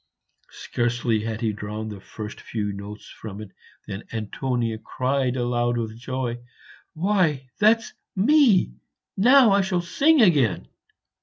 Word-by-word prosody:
Scarcely 120 -1 -1
had 110 -1 -4
he 110 -2 0
drawn 105 +1 -5
the 105 -2 -8
first 105 +1 -8
few 105 -3 -3
notes 100 +1 -9
from 105 -2 -9
it 105 -2 -9 0.3
than 100 -1 -6
Antonia 115 +1 -2
cried 130 +1 -1
aloud 120 -1 0
with 110 -2 -3
joy, 125 0 -4 0.6
"Why, 160 -8 0
that's 220 +2 +3 0.2
me! 210 - +4 0.4
now 245 +2 +6
I 200 0 +4
shall 190 -2 0
sing 295 - +3
again." 145 - +2
120 Hz, 130 wpm, -24 LUFS, 110-185 Hz, 0.6 s, now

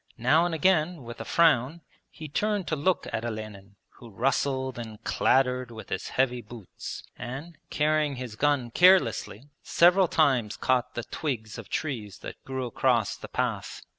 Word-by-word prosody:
Now 150 +8 +3
and 170 - -2
again 160 -2 +2
with 120 -1 -8
a - - -6
frown 160 +1 +3 0.3
he 155 - -9
turned 205 +5 -1
to 155 - +1
look 170 +5 0
at 110 - -2
Olenin, 110 -3 -7 0.2
who 120 - -12
rustled 130 +2 -1
and 110 -2 -8
clattered 125 -1 +2
with 110 -2 -10
his - - -3
heavy 125 -2 0
boots 110 -3 -9 0.2
and, 140 +8 -7
carrying 150 -1 +1
his 125 -4 -7
gun 140 -2 +1
carelessly, 145 - +3
several 180 +2 +4
times 130 -10 +2
caught 130 -2 0
the 120 - -3
twigs 115 -9 -4
of 110 - -10
trees 110 - -4
that - - -9
grew 130 -1 -4
across 120 -2 +1
the - - -10
path. - - -3
130 Hz, 160 wpm, -27 LUFS, 115-155 Hz, 0.3 s, several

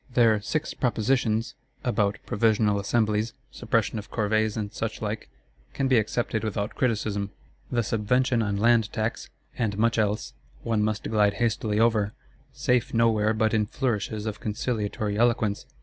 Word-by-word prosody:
Their 115 -4 +4
"Six 155 +9 -2
Propositions" 120 0 0 0.3
about 105 -5 +1
Provisional 105 -1 +2
Assemblies, 110 +1 0 0.2
suppression 115 -1 0
of 105 - -10
Corvées 110 0 0
and 105 -2 -3
suchlike, 110 -1 -4 0.5
can 135 - +1
be 130 -3 +5
accepted 110 +1 -1
without 105 -1 -2
criticism. 105 -4 -1 0.4
The 120 -1 +1
Subvention 120 +3 +1
on 100 -2 -1
Land 115 0 +3
tax, 110 +1 -3 0.3
and 105 -4 0
much 115 +1 +2
else, 105 0 -1 0.3
one 115 -2 +1
must 110 0 -1
glide 105 -2 +2
hastily 110 -2 0
over; 110 -2 +2 0.4
safe 125 -2 0
nowhere 110 -2 +3
but 110 0 +1
in 105 -1 +2
flourishes 110 -4 -2
of 110 -1 -4
conciliatory 105 -1 -2
eloquence. 115 -4 +1
110 Hz, 140 wpm, -26 LUFS, 105-115 Hz, 0.5 s, be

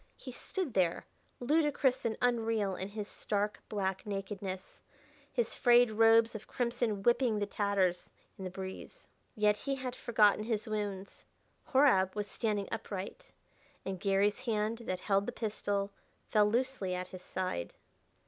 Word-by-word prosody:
He 255 - -8
stood 330 - -4
there, 175 -3 +1 0.3
ludicrous 285 -1 +2
and 225 -1 0
unreal 225 -5 +1
in 190 - -4
his 210 0 -5
stark 210 0 -2
black 190 -2 -1
nakedness, 195 -2 -5 0.5
his 480 - -1
frayed 240 -2 +5
robes 225 +1 +5
of 215 -1 -8
crimson 235 -4 -1
whipping 240 -2 +3
to 205 - 0
tatters 200 -3 0 0.3
in 190 - -8
the 185 - -3
breeze. 190 - -8 0.3
Yet 210 -1 +3
he 275 +6 -3
had 255 -2 -5
forgotten 215 -3 +3
his 225 0 -1
wounds 205 -3 -4 0.4
Horab 245 -10 +4
was 210 -1 -1
standing 205 -1 -2
upright 220 - -6 0.5
and 190 -1 -3
Garry's 200 +5 +1
hand 220 0 0
that 185 0 -3
held 200 -1 +1
the - - -1
pistol 205 -3 -2 0.4
fell 210 -2 +5
loosely 235 -5 0
at 180 0 -4
his 185 - -9
side. 185 - -3
210 Hz, 145 wpm, -32 LUFS, 195-240 Hz, 0.5 s, frayed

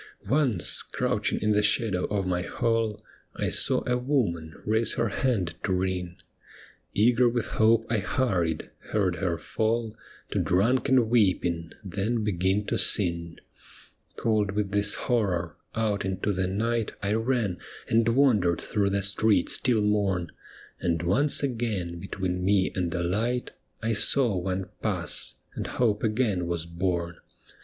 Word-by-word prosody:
Once, 130 - +3
crouching - - -1
in 105 - +2
the 105 0 +3
shadow 100 -2 +2
of 100 -2 -1
my 90 -1 0
hall 115 +2 -1 0.4
I - - -1
saw - - +2
a 125 0 +1
woman 105 - -1
raise 110 +2 +1
her 115 - 0
hand 100 -7 0
to - - -1
ring. 90 -1 -2 0.8
Eager 120 +3 +4
with 120 -2 -1 0.2
hope 115 +1 +4
I 115 -2 0
hurried 90 -8 -1
— - - -43
heard 95 -4 +1
her 90 -4 -1
fall 110 0 -1 0.4
To - - 0
drunken 125 +5 +2
weeping, 90 -7 +1
then 105 +4 -2
begin 95 0 0
to - - -1
sing. 85 -4 +2 0.8
Cold 105 -3 0
with 100 -1 -1
this 105 0 +2
horror, 95 -9 -1 0.2
out 110 -3 0
into 95 +1 -1
the 95 0 -1
night 115 +4 -1
I 100 +1 0
ran 115 -5 0 0.3
and 115 0 +2
wandered 115 -9 +3
through 100 -2 0
the 100 0 -1
streets 100 -1 +2
till 115 -5 +2
morn; 100 -5 0 0.5
And 85 -1 -1
once 120 +13 +2
again 110 -10 -2
between 90 -1 -3
me 95 0 +2
and 90 -2 -1
the 85 0 -2
light 115 +8 -1 0.3
I 115 +1 +1
saw 115 0 +3
one 95 +1 -2
pass - - -1
— - - -34
and - - -4
hope 110 -4 0
again 105 -6 0
was 85 -1 -2
born. 85 0 -2
100 Hz, 150 wpm, -27 LUFS, 90-115 Hz, 0.8 s, Eager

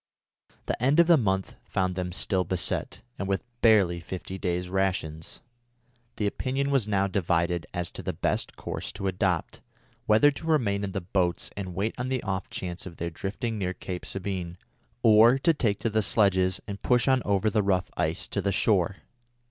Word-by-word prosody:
The - - -3
end 140 +6 +3
of 170 - +8
the 170 0 +6
month 95 -8 0
found 95 -1 -1
them 90 0 -3
still 95 +1 0
beset, 90 +2 -1 0.2
and 100 - -2
with 95 -1 -1 0.2
barely 100 -7 +4
fifty 95 +2 -7
days' 90 -1 -1
rations. 90 -4 -2 0.7
The 105 - -1
opinion 135 +6 -1
was 135 -6 +2
now 100 -2 +2
divided 85 -4 0
as 90 -1 -2
to - - -7
the - - -2
best - - -2
course - - -5
to 100 - -6
adopt, 95 -3 -1 0.5
whether 110 +7 +6
to 160 +3 -8
remain 110 -11 +1
in 95 -1 -3
the 95 - -2
boats 90 -1 -1
and 95 -3 -5
wait 105 +5 -1
on 125 +1 -2
the 130 -2 -1
off 95 -2 -3
chance 90 0 -5
of 85 - -10
their 85 0 -3
drifting 110 +6 -4
near 90 -1 -2
Cape 90 -1 -6
Sabine, 90 -3 -4 0.5
or 115 +3 +7
to 165 +5 +3
take 110 -9 0
to 115 - +1
the 110 +1 +2
sledges 95 -3 +3
and 100 0 -6
push 125 -1 +2
on 130 -1 +4
over 100 +1 +1
the 110 - +2
rough 95 -2 0
ice 80 +3 -1
to 100 - -1
the 100 +1 0
shore. 95 -2 +2
95 Hz, 190 wpm, -27 LUFS, 90-110 Hz, 0.7 s, of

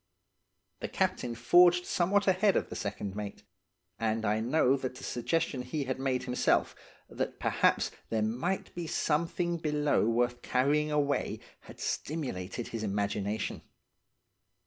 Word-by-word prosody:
"The - - -3
captain 120 -1 -1
forged 175 +9 +5
somewhat 195 +3 +2
ahead 195 +1 +3
of - - 0
the - - -6
second 100 -1 -4
mate; 105 -1 -6 0.6
and 110 0 0
I 105 +1 +2
know 130 +3 +3
that 130 -2 -4
the 130 - -10
suggestion 135 +2 -1
he 135 +4 -3
had 130 0 -3
made 130 -2 0
himself, 125 0 +1 0.3
that - - -4
perhaps - - +2 0.2
there 110 -1 +1
might 125 - -2
be 175 -2 -5
something 170 +3 0
below 150 -6 +1
worth 120 +1 +1
carrying 145 +4 +2
away, 145 -1 0 0.2
had - - -14
stimulated 120 - -3
his 115 - -4
imagination. 100 0 -2
130 Hz, 135 wpm, -30 LUFS, 115-160 Hz, 0.6 s, forged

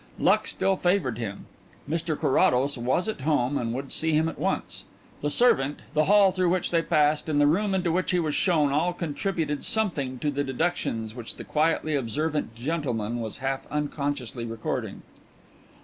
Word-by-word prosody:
Luck - - +3
still 195 -1 0
favoured 175 - +1
him; 100 -4 -5 0.4
Mr 160 0 -2
Carrados 135 +1 +3
was 130 - 0
at 215 -10 -3
home 145 -2 +1
and 115 -4 -1
would 135 +3 -5
see 160 0 +1
him 155 +1 +3
at 165 - -6
once. - - -2 0.4
The 145 - 0
servant, 145 - +3
the 155 0 +3
hall 200 0 +6
through 185 -1 +1
which 180 +1 0
they 165 -1 +3
passed, 150 -1 +2
and 145 -1 +2
the 145 - +5
room 190 +6 +2
into 180 -3 +1
which 180 +2 0
he 180 - +2
was 155 -3 -1
shown, 155 -6 +2
all 165 +5 +1
contributed 165 -2 -2
something 150 -12 -1
to 145 +4 -1
the 145 0 -1
deductions 130 -6 -2
which 120 -1 -7
the - - -8
quietly 155 0 +1
observant 145 0 -2
gentleman 120 -5 -2
was 110 -2 -5
half 135 0 -2
unconsciously 145 -5 -3
recording. 115 -1 -4
150 Hz, 175 wpm, -26 LUFS, 130-170 Hz, 0.4 s, hall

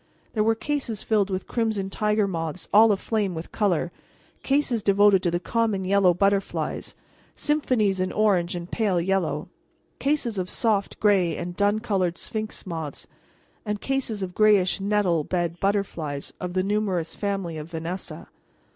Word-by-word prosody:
There 215 - +2
were 225 +1 +3
cases 250 -5 -3
filled 210 -3 +2
with 190 -1 -3
crimson 215 -5 -1
tiger 210 0 +1
moths 165 -2 -4
all 220 +2 +7
aflame 205 -2 -1
with 160 +1 -7
color; 175 -5 0 0.5
cases 270 -5 +1
devoted 200 -1 +5
to 175 - +1
the 175 +1 0
common 210 0 0
yellow 195 -1 +4
butterflies; 195 +2 -1 0.4
symphonies 250 -10 +1
in 185 0 0
orange 185 -5 +2
and 175 0 -6
pale 205 -6 +1
yellow; 190 +2 0 0.5
cases 270 -8 0
of 185 0 -3
soft 210 -4 0
gray 195 -5 +3
and 175 0 -5
dun 205 +2 +2
colored 190 -6 0
sphinx 215 0 -4
moths; 160 -5 -5 0.6
and 210 -1 -3
cases 250 -6 -2
of 180 -1 -5
grayish 205 -4 +4
nettle 195 -5 +2
bed 170 0 -2
butterflies 175 -8 -2
of 180 -1 -4
the 185 0 +1
numerous 195 -5 -1
family 195 -6 -3
of 155 +2 -8
Vanessa. 170 +3 -5
195 Hz, 150 wpm, -25 LUFS, 180-215 Hz, 0.6 s, all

